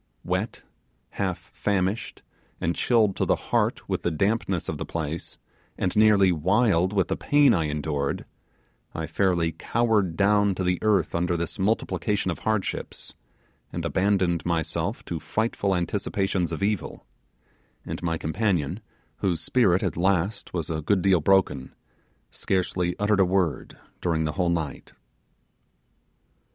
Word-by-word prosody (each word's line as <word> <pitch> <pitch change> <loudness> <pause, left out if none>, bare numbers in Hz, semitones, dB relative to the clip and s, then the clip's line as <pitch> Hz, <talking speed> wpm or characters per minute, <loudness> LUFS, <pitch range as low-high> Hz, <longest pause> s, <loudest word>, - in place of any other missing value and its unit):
Wet, - - -2 0.5
half 95 -3 -2
famished, 100 +1 -2 0.4
and 85 +1 -1
chilled 110 -5 +2
to - - 0
the - - +3
heart - - -1
with - - -1
the - - 0
dampness 95 +1 0
of - - -4
the - - -2
place, 80 0 -4 0.4
and 90 - -1
nearly 105 -3 +5
wild 95 +2 +2
with 100 -3 +1
the - - -1
pain 145 -3 +4
I 85 -5 +1
endured, 75 -1 -2 0.7
I - - -2
fairly 90 -4 +1
cowered 105 0 0
down 100 -1 +3
to 95 - -2
the 90 -1 +1
earth 105 -6 +2
under 85 +1 0
this 85 +3 -4
multiplication 105 -1 0
of - - -6
hardships, 110 -3 -3 0.6
and 85 -1 -4
abandoned 90 0 +1
myself 85 -2 -2
to - - -4
frightful 105 -3 -1
anticipations 95 -1 -1
of 80 - -3
evil; 100 -7 -2 0.8
and - - -5
my 80 -1 -1
companion, 90 -1 -1 0.4
whose 90 -4 0
spirit 95 0 +2
at 95 - -1
last 95 +3 0
was 85 -3 -3
a 80 -1 -2
good 95 +4 +1
deal 95 -3 +4
broken, 95 -6 +1 0.6
scarcely 90 -2 -1
uttered 105 0 +2
a - - +7
word 90 -4 -1 0.2
during 80 -2 +1
the 75 - -1
whole 90 0 0
night. 80 -4 -3
95 Hz, 140 wpm, -25 LUFS, 85-100 Hz, 0.8 s, a